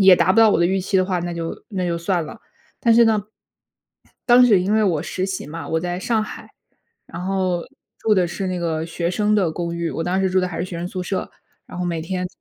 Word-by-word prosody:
也 190 Hz, -2 st, +8 dB
达 -, -, +3 dB
不 -, -, +2 dB
到 225 Hz, -1 st, +7 dB
我 -, -, +2 dB
的 170 Hz, -, +4 dB
预 190 Hz, +1 st, +1 dB
期 190 Hz, +1 st, 0 dB
的 185 Hz, -, +4 dB
话， 185 Hz, -2 st, -1 dB
那 175 Hz, 0 st, -3 dB
就 165 Hz, -1 st, -5 dB
那 185 Hz, -4 st, -2 dB
就 170 Hz, -, -1 dB
算 170 Hz, 0 st, -1 dB
了。 225 Hz, -, -10 dB, 0.4 s
但 230 Hz, -, +4 dB
是 235 Hz, +1 st, +6 dB
呢， 220 Hz, -2 st, +2 dB, 1.0 s
当 245 Hz, 0 st, +7 dB
时 210 Hz, -6 st, +5 dB
因 190 Hz, +3 st, 0 dB
为 220 Hz, 0 st, +3 dB
我 170 Hz, -7 st, +1 dB
实 185 Hz, +2 st, -3 dB
习 190 Hz, -1 st, -4 dB
嘛， 165 Hz, +2 st, -7 dB
我 160 Hz, -, +1 dB
在 175 Hz, +2 st, -3 dB
上 225 Hz, 0 st, +1 dB
海， -, -, -10 dB, 0.6 s
然 175 Hz, +2 st, -7 dB
后 185 Hz, -2 st, 0 dB, 0.3 s
住 220 Hz, -, +1 dB
的 185 Hz, -3 st, +3 dB
是 190 Hz, +2 st, -4 dB
那 185 Hz, -1 st, -2 dB
个 160 Hz, -2 st, -1 dB
学 170 Hz, +1 st, -3 dB
生 210 Hz, +2 st, +1 dB
的 180 Hz, -6 st, +1 dB
公 170 Hz, +1 st, -3 dB
寓， 170 Hz, -1 st, -2 dB
我 -, -, -3 dB
当 180 Hz, +3 st, 0 dB
时 190 Hz, -, +2 dB
住 185 Hz, -, +3 dB
的 185 Hz, -, -1 dB
还 165 Hz, -, -6 dB
是 -, -, -1 dB
学 180 Hz, -1 st, -6 dB
生 175 Hz, +1 st, -4 dB
宿 185 Hz, -, -5 dB
舍， 185 Hz, +1 st, -3 dB, 0.4 s
然 -, -, -9 dB
后 180 Hz, -, -1 dB
每 170 Hz, -2 st, -2 dB
天 180 Hz, +2 st, -3 dB
180 Hz, 280 characters per minute, -21 LUFS, 170-195 Hz, 1.0 s, 也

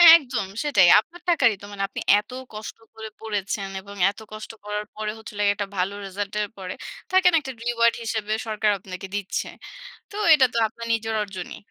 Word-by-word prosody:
একদম 250 Hz, -, 0 dB, 0.2 s
সেটাই। 200 Hz, -12 st, +5 dB
আপনার 345 Hz, +8 st, -10 dB
টাকারই 250 Hz, -11 st, +4 dB
তো -, -, -9 dB
মানে 200 Hz, -1 st, -3 dB
আপনি -, -, -6 dB, 0.2 s
এত 210 Hz, +4 st, -11 dB, 0.2 s
কষ্ট 215 Hz, +1 st, -7 dB, 0.2 s
করে 220 Hz, 0 st, -7 dB
পড়েছেন 205 Hz, -2 st, -2 dB
এবং 200 Hz, +1 st, -11 dB
এত 205 Hz, -, -8 dB
কষ্ট 215 Hz, +1 st, -7 dB
করার 210 Hz, 0 st, -3 dB
পরে 215 Hz, 0 st, -2 dB
হচ্ছে 220 Hz, -, -10 dB
হলো 205 Hz, -, -3 dB
গিয়ে 200 Hz, -, +4 dB
১টা 205 Hz, -1 st, -3 dB
ভালো 185 Hz, +2 st, 0 dB
রিসাল্ট 200 Hz, +1 st, -4 dB
এর 205 Hz, -, -1 dB
পরে 185 Hz, -1 st, -5 dB, 0.4 s
থাকে 375 Hz, -1 st, +5 dB
না -, -, +3 dB
একটা 265 Hz, -2 st, -6 dB
Reward 235 Hz, -1 st, +3 dB
হিসেবে 220 Hz, -1 st, -2 dB
সরকার 215 Hz, -1 st, +2 dB
আপনাকে 190 Hz, 0 st, -8 dB
দিচ্ছে। 200 Hz, -2 st, -2 dB, 0.6 s
তো -, -, -9 dB, 0.2 s
এটা 270 Hz, -4 st, +6 dB
তো -, -, -1 dB
আপনার 230 Hz, +2 st, -9 dB
নিজের 225 Hz, 0 st, -1 dB
অর্জনই। 190 Hz, -3 st, -7 dB
215 Hz, 195 wpm, -24 LUFS, 200-230 Hz, 0.6 s, এটা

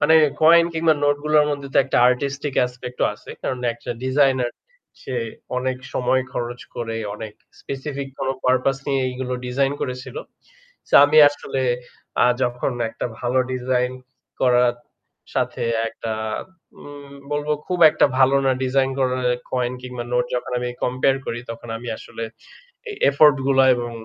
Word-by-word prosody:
মানে 160 Hz, -, +5 dB, 0.3 s
কয়েন 170 Hz, +2 st, +7 dB
কিংবা 160 Hz, -1 st, +3 dB
নোট 145 Hz, 0 st, +3 dB
গুলোর 150 Hz, -1 st, +4 dB
মধ্যে 140 Hz, -1 st, -4 dB
তো -, -, +5 dB
একটা 135 Hz, -, +1 dB
আর্টিস্টিক 140 Hz, +2 st, -2 dB
অ্যাসপেক্ট 125 Hz, 0 st, -4 dB
ও -, -, +4 dB
আছে। -, -, -13 dB
কারণ 130 Hz, -, -2 dB, 0.2 s
একটা 120 Hz, +1 st, -8 dB
ডিজাইনের 130 Hz, -2 st, +2 dB, 0.5 s
সে 130 Hz, -, -5 dB, 0.4 s
অনেক 130 Hz, 0 st, -2 dB, 0.2 s
সময় 130 Hz, +1 st, +1 dB
খরচ 120 Hz, 0 st, -4 dB, 0.2 s
করে 115 Hz, -1 st, -3 dB, 0.2 s
অনেক 105 Hz, 0 st, -8 dB, 0.3 s
স্পেসিফিক 140 Hz, 0 st, -5 dB
কোনো 135 Hz, -1 st, -1 dB
পারপাস 130 Hz, +1 st, +2 dB
নিয়ে 135 Hz, -2 st, +1 dB
এগুলো 125 Hz, 0 st, -4 dB
ডিজাইন 135 Hz, +2 st, +1 dB
করেছিল। 125 Hz, 0 st, -5 dB, 0.7 s
সো -, -, -1 dB
আমি 150 Hz, +2 st, +4 dB
আসলে 145 Hz, -2 st, -4 dB, 0.6 s
আ -, -, +6 dB, 0.2 s
যখন 125 Hz, +1 st, -1 dB, 0.2 s
একটা -, -, -4 dB
ভালো 125 Hz, +1 st, 0 dB
ডিজাইন 125 Hz, 0 st, 0 dB, 0.5 s
করার 125 Hz, -1 st, +4 dB, 0.6 s
সাথে -, -, -1 dB, 0.3 s
একটা 115 Hz, 0 st, -5 dB, 0.7 s
উম 145 Hz, -1 st, -11 dB, 0.2 s
বলবো 145 Hz, +1 st, -1 dB
খুব 180 Hz, -, -2 dB
একটা -, -, +3 dB
ভালো 135 Hz, +1 st, +5 dB
না 130 Hz, -, +4 dB
ডিজাইন 130 Hz, +1 st, +1 dB
করা 130 Hz, -1 st, +1 dB, 0.4 s
কয়েন 125 Hz, -1 st, 0 dB
কিংবা 125 Hz, -1 st, -6 dB
নোট 125 Hz, 0 st, +2 dB
যখন 125 Hz, -, -3 dB
আমি 125 Hz, 0 st, -3 dB, 0.2 s
কম্পেয়ার 130 Hz, +2 st, +2 dB
করি 120 Hz, -, -3 dB
তখন 115 Hz, +1 st, -9 dB
আমি 120 Hz, +1 st, -8 dB
আসলে 115 Hz, -, -7 dB, 0.7 s
এই 415 Hz, -, -7 dB
এফোর্ট 145 Hz, 0 st, +6 dB
গুলা 135 Hz, -1 st, +4 dB
এবং 120 Hz, 0 st, -4 dB
130 Hz, 150 wpm, -22 LUFS, 125-140 Hz, 0.7 s, কয়েন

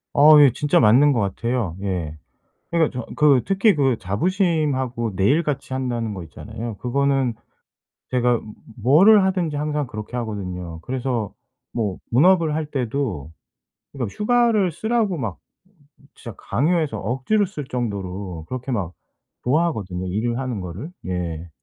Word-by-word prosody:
어 150 Hz, +1 st, +8 dB
예. 140 Hz, -3 st, +7 dB
진짜 145 Hz, +2 st, +2 dB
맞는 125 Hz, +7 st, +6 dB
것 125 Hz, -, +1 dB
같아요. 105 Hz, -1 st, -2 dB
예. 90 Hz, -6 st, -3 dB, 0.5 s
그러니까 160 Hz, -6 st, +1 dB
저 -, -, -5 dB
그 140 Hz, -5 st, +4 dB
특히 195 Hz, +2 st, +3 dB
그 135 Hz, -5 st, +2 dB
자부심하고 130 Hz, -, 0 dB
내 95 Hz, +1 st, +1 dB
일 150 Hz, +6 st, +4 dB
같이 140 Hz, -3 st, -3 dB
한다는 120 Hz, -4 st, -2 dB
거 95 Hz, -, -6 dB
있잖아요. 110 Hz, +7 st, -7 dB
그거는 135 Hz, 0 st, +1 dB, 0.8 s
제가 125 Hz, -2 st, +2 dB, 0.4 s
뭐를 190 Hz, -, +6 dB
하든지 180 Hz, -5 st, 0 dB
항상 150 Hz, 0 st, -1 dB
그렇게 105 Hz, +2 st, -7 dB
하거든요. 90 Hz, -7 st, -5 dB
그래서 125 Hz, -2 st, -3 dB, 0.4 s
뭐 105 Hz, -6 st, -2 dB
본업을 165 Hz, +4 st, +4 dB
할 160 Hz, -, -1 dB
때도 120 Hz, -, -3 dB, 0.6 s
그러니까 120 Hz, -7 st, -4 dB
휴가를 220 Hz, -4 st, +2 dB
쓰라고 220 Hz, +1 st, 0 dB
막 105 Hz, -, -4 dB, 0.8 s
진짜 115 Hz, -5 st, -9 dB
강요해서 155 Hz, -2 st, 0 dB
억지로 135 Hz, -, 0 dB
쓸 150 Hz, -4 st, -7 dB
정도로 100 Hz, -8 st, -4 dB
그렇게 130 Hz, +1 st, -4 dB
막 95 Hz, -7 st, -2 dB, 0.5 s
좋아하거든요 110 Hz, -, 0 dB
일을 115 Hz, +6 st, -1 dB
하는 125 Hz, -6 st, -3 dB
거를. 90 Hz, -, -7 dB, 0.2 s
예. 85 Hz, -2 st, -4 dB
125 Hz, 295 characters per minute, -22 LUFS, 105-150 Hz, 0.8 s, 어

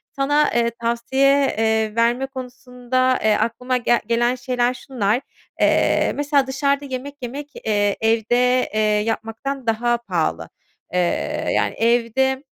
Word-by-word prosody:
Sana, 290 Hz, +2 st, +2 dB
eee, 235 Hz, -1 st, +2 dB
tavsiye, 265 Hz, +4 st, +2 dB
eee, 220 Hz, -1 st, +1 dB
verme 235 Hz, +3 st, +2 dB
konusunda, 255 Hz, -1 st, -2 dB
eee, 220 Hz, 0 st, +4 dB
aklıma 250 Hz, +2 st, -1 dB
gel 240 Hz, -1 st, +2 dB
gelen 240 Hz, +1 st, +1 dB
şeyler 245 Hz, -1 st, 0 dB
şunlar. 245 Hz, -3 st, -1 dB, 0.4 s
Eee, -, -, +3 dB
mesela 285 Hz, -2 st, +1 dB
dışarıda 280 Hz, +1 st, 0 dB
yemek 275 Hz, +1 st, -6 dB
yemek, 275 Hz, +4 st, -6 dB, 0.2 s
eee, 205 Hz, -2 st, +1 dB
evde, 240 Hz, +3 st, +2 dB
eee, 215 Hz, -, 0 dB
yapmaktan 225 Hz, +5 st, -2 dB
daha 240 Hz, +2 st, +1 dB
pahalı. 165 Hz, -, -2 dB, 0.4 s
Eee, 180 Hz, -, +2 dB, 0.5 s
yani, -, -, 0 dB
evde 240 Hz, +3 st, +1 dB
245 Hz, 125 wpm, -21 LUFS, 225-265 Hz, 0.5 s, eee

